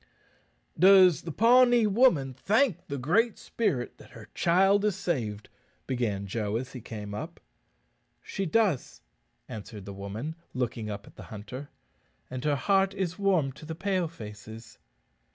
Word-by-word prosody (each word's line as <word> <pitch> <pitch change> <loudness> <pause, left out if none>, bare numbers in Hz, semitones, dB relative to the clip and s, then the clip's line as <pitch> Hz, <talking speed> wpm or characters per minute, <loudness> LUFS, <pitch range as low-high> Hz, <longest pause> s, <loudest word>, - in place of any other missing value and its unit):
"Does 185 -2 +7
the 170 - -6
Pawnee 240 - +5
woman 195 - +3
thank 215 - +1
the 140 - -4
Great 205 - +2
Spirit 135 - -2
that - - -15
her - - -13
child 195 +4 +3
is 210 -3 +1
saved?" 115 - -3 0.4
began 110 -6 -2
Joe 105 +1 -2
as 125 +3 -4
he 125 - -7
came 105 -2 -7
up. 155 - -6 0.8
"She 195 -2 -3
does," 190 - 0 0.4
answered 105 -2 -8
the 100 - -7
woman, 100 +10 -5 0.2
looking 120 -3 -2
up 100 0 -6
at - - -17
the - - -9
hunter. 125 +7 -8 0.6
"And 130 -1 -5
her 150 -1 +2
heart 195 +5 +2
is 185 -1 -3
warm 185 -9 +2
to 140 +4 -15
the 160 +1 -6
Pale 185 -1 0
faces." 110 -5 -11
150 Hz, 150 wpm, -28 LUFS, -, 0.8 s, Does